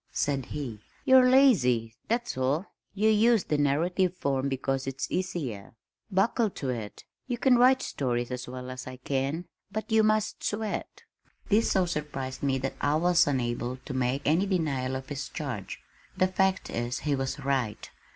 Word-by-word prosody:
said 135 -3 -1
he. 130 -8 -5 0.3
"You're 260 -1 +7
lazy, 125 - +4
that's 235 - -1
all. 135 +7 0 0.3
You 210 +2 +2
use 220 0 +4
the 150 - 0
narrative 175 +6 +1
form 140 -2 0
because 135 0 -2
it's 135 0 -2
easier. 140 - -3 0.3
Buckle 215 +3 +2
to 140 -8 -5
it 110 -4 -6 0.2
you 245 -2 -2
can 255 +1 +4
write 255 +2 +5
stories 120 -2 -2
as 125 0 -4
well 125 0 -6
as 130 0 -7
I 130 - -6
can 135 +6 -2 0.3
but 215 +2 -4
you 220 0 +5
must 215 0 +1
sweat!" 215 0 -3 0.5
This 215 +2 +3
so 190 -2 +3
surprised 150 -6 -4
me 135 -2 +1
that 135 +1 -3
I 145 +1 +2
was 175 +1 +4
unable 120 -2 -1
to 135 - -5
make 130 +2 0
any 165 +7 +3
denial 140 -9 0
of 130 0 -6
his 145 -1 -4
charge. 135 - -5 0.4
The 185 - +4
fact 190 +1 0
is 120 +1 -2
he 150 - 0
was 135 +1 -2
right. 135 -6 -1
145 Hz, 170 wpm, -28 LUFS, 130-190 Hz, 0.5 s, You're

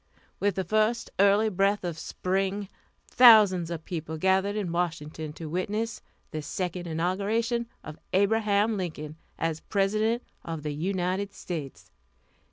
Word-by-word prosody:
With 205 -2 +1
the 190 - -1
first 215 +5 +1
early 200 +2 +5
breath 200 0 +1
of 175 -2 -3
spring, 195 +2 -2 0.4
thousands 210 -8 +7
of 165 -2 -5
people 160 -2 -4
gathered 190 +4 +2
in 200 -5 -2
Washington 160 -3 -3
to 160 +1 -7
witness 210 +7 -2 0.3
the 155 - -3
second 175 +3 -4
inauguration 205 +8 0 0.2
of 155 0 -9
Abraham 210 +2 +2
Lincoln 155 -4 -5 0.2
as 165 -1 -1
President 215 +6 0 0.2
of 165 -3 -5
the 150 -1 -2
United 185 +4 -1
States. 135 - -7
190 Hz, 130 wpm, -27 LUFS, 165-205 Hz, 0.4 s, thousands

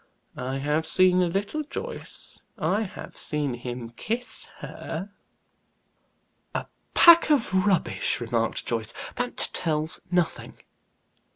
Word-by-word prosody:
I 130 +2 -3
have 150 +3 0
seen 185 0 +5
a 180 - +3
little, 200 - -1
Joyce; 470 - -4 0.2
I 210 - +1
have 210 - -7
seen 150 -4 -1
him 120 -1 -6
kiss 230 - -3
her." 190 +5 -6 1.4
"A - - -1 0.3
pack 340 -1 +8
of 210 -9 +2
rubbish!" 195 -4 +1
remarked 115 -1 -1
Joyce. 115 -2 -2 0.2
"That - - -2 0.2
tells 155 0 +2
nothing." 175 -2 -1
170 Hz, 110 wpm, -26 LUFS, 130-205 Hz, 1.4 s, pack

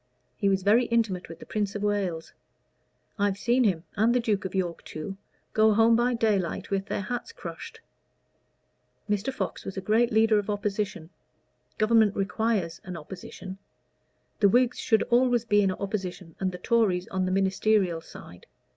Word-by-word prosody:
He 200 - +1
was 190 -1 +1
very 220 +5 +4
intimate 220 -8 0
with 165 - -9
the - - -12
Prince 205 -2 -2
of 205 - -3
Wales. 195 -6 -1 0.9
I've 200 -1 +1
seen 240 +5 +2
him, 175 -6 +1
and 225 +4 +3
the - - +4
Duke 210 -5 -1
of 190 - -4
York 175 -3 -2
too, 155 +5 -6 0.4
go 215 -1 +4
home 225 +1 +5
by 240 +1 +2
daylight 200 -5 0
with 195 0 -1
their - - -2
hats 245 - -4
crushed. - - -9 1.3
Mr. 205 +5 -1
Fox 200 -7 -4
was 195 - -7
a - - 0
great 220 +5 +2
leader 220 -1 +4
of 205 - -5
Opposition: 205 -4 -3 0.7
Government 215 -1 +4
requires 200 -4 -1
an 180 -2 -6
Opposition. 190 +3 -9 0.8
The 200 - +5
Whigs 245 +3 +2
should 220 -3 +2
always 240 -1 +2
be 205 -2 +4
in 195 - +2
opposition, 185 -3 -5
and 190 -1 0
the 180 - -7
Tories 195 -5 +1
on 185 -1 -1
the - - -1
ministerial 190 -2 +2
side. 90 - -13
205 Hz, 165 wpm, -27 LUFS, 190-225 Hz, 1.3 s, home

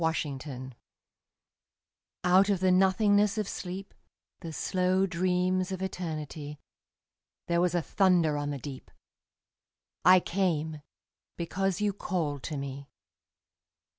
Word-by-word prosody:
The 155 -4 -1
Call 130 -3 -7 1.5
Out 185 +3 +5
of 200 -3 +2
the 185 0 +3
nothingness 205 +3 +4
of 210 -2 -1
sleep, 190 +1 -6 0.5
The 165 -3 -7
slow 185 +3 +1
dreams 185 +1 0
of 190 0 -3
Eternity, 155 -5 -5 0.9
There 170 0 +1
was 180 0 +1
a 175 - +1
thunder 180 -6 +3
on 145 0 -2
the 145 - -3
deep: 135 -1 -8 1.1
I 185 0 +8
came, 160 -5 -1 0.6
because 190 +3 -1
you 205 -1 +1
called 160 -8 -2
to 150 - -3
me. 140 0 -6
180 Hz, 115 wpm, -29 LUFS, 150-190 Hz, 1.5 s, I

